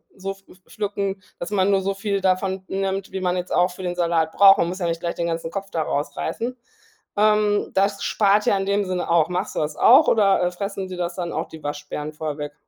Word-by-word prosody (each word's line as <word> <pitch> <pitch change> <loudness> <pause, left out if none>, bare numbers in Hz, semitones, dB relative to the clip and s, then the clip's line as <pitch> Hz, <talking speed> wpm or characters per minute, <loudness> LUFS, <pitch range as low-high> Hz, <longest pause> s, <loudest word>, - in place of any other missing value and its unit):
so 195 +1 -4
pfl 195 -1 -20
pflücken, 200 -2 -3 0.2
dass 175 - -4
man 200 -1 +2
nur 195 -1 +3
so 195 +1 -1
viel 200 0 -1
davon 190 0 0
nimmt, 195 0 -2
wie 190 - -3
man 180 0 0
jetzt 180 0 -4
auch 180 +1 +3
für 180 - -10
den 175 -1 -2
Salat 165 -2 +1
braucht. 195 -1 +7
Man - - +2
muss 180 +2 -5
ja 175 - -1
nicht 165 0 -2
gleich 170 0 -3
den 170 - -2
ganzen 165 -1 -3
Kopf 195 +3 -6
da 165 - -1
rausreißen. 150 - -3 0.6
Ähm, 210 0 +2
das 200 +1 +1
spart 205 0 +2
ja 200 - +3
in 195 - -2
dem 200 +1 +1
Sinne 185 -1 -3
auch. 170 -1 +3
Machst 180 +3 -3
du - - 0
das 150 0 -2
auch 275 +6 +7
oder, 200 -4 +4
äh, 180 - +1
fressen 195 +1 -4
dir 185 -1 -7
das 175 -1 -3
dann 175 -2 -4
auch 160 +2 -3
die 160 -1 -12
Waschbären 145 +1 -5
vorher 150 -1 -4
weg? 145 -1 -5
190 Hz, 240 wpm, -23 LUFS, 170-200 Hz, 0.6 s, braucht